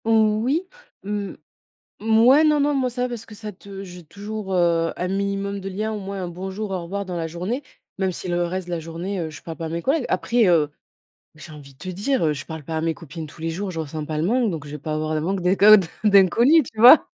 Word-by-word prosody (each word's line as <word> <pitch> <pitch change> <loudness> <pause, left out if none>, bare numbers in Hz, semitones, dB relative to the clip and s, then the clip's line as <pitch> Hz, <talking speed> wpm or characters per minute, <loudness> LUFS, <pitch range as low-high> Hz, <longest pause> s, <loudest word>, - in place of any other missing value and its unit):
Oui. 225 - +2 0.4
Mmh. 200 -1 -3 0.7
Mouais, 225 +7 +5
non, 300 -1 +4
non, 290 +1 +2
moi 265 -2 +1
ça 250 +1 -3
va, 250 - -1
parce 235 -2 -6
que 215 - -12
ça 210 0 -7
te 195 0 -10
j'ai 180 -2 -10
toujours, 205 +3 -6
heu, 170 -2 +2
un 180 - -2
minimum 200 +1 -2
de 195 0 -5
liens, 215 +3 -3
au 210 - -4
moins 195 0 -5
un - - -3
bonjour, 190 +4 -5
au 185 -2 -2
revoir 200 +4 -4
dans 180 -2 -5
la 165 -1 -2
journée, 185 - -4 0.3
même 190 -1 0
si 185 - -6
le 175 0 0
reste 180 +1 -3
de 175 - -4
la 170 - -1
journée, 170 +4 -5
heu, 165 -2 -3
je 155 -5 -11
parle 165 -1 -8
pas 165 - -4
à - - -4
mes 170 +1 -3
collègues. 275 - +1
Après, 230 +5 +2
heu, 160 -4 +4 0.7
j'ai 155 +1 -11
envie 145 -2 -12
de - - -31
te 185 - -8
dire, 205 +6 0
heu, 155 - +2
je 145 0 -7
parle 160 -2 -8
pas 160 +3 -4
à - - 0
mes 165 0 +1
copines 160 0 -8
tous 150 - -15
les 165 - -2
jours, 190 +4 -4
je 165 -3 -4
ressens 155 0 -5
pas 155 0 -3
le 155 - 0
manque, 235 +3 +2
donc 155 -4 -5
je 145 - -9
vais 150 - -5
pas 155 +2 -4
avoir 155 0 -2
le 155 - 0
manque 190 +3 -1
d'inco 195 +4 +7
d 190 -4 +1 0.2
d'inconnu, 215 - +6
tu 220 -2 -8
vois? 250 +7 +9
190 Hz, 265 wpm, -23 LUFS, 165-215 Hz, 0.7 s, vois